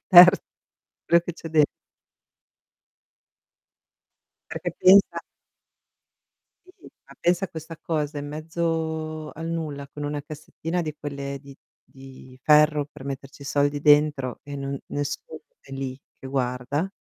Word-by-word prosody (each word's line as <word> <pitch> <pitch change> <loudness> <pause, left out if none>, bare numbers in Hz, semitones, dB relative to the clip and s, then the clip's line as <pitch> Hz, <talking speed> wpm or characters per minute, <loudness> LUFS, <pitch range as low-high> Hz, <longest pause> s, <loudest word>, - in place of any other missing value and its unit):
il - - -57
ter 180 +1 +10 0.7
quello 170 0 +5
che 175 - -4
c'è 165 - -9
den 155 -1 +5 2.9
Perché - - -3
pensa 195 +2 +6 1.5
Sì, 365 - -17 0.3
ma - - -15
pensa 175 +2 +2
a - - -5
questa 160 0 -8
cosa 150 -2 -2
in 145 0 -5
mezzo 160 0 -3
al 165 +1 -6
nulla 150 -4 -4
con 145 +1 -8
una 145 0 -3
cassettina 160 +3 -4
di 155 -2 -4
quelle 140 -1 -5
di 140 -1 -13 0.3
di 130 -1 -14
ferro 150 0 +5
per 145 -1 -14
metterci 135 0 -7
i - - -9
soldi 145 0 +1
dentro 145 -3 +3
e 145 0 -7
non 140 0 -4
nessuno 145 +2 -4 0.2
è 135 - -15
lì 135 -1 -4 0.2
che - - -8
guarda, 130 +4 -1
150 Hz, 135 wpm, -25 LUFS, 140-160 Hz, 2.9 s, ter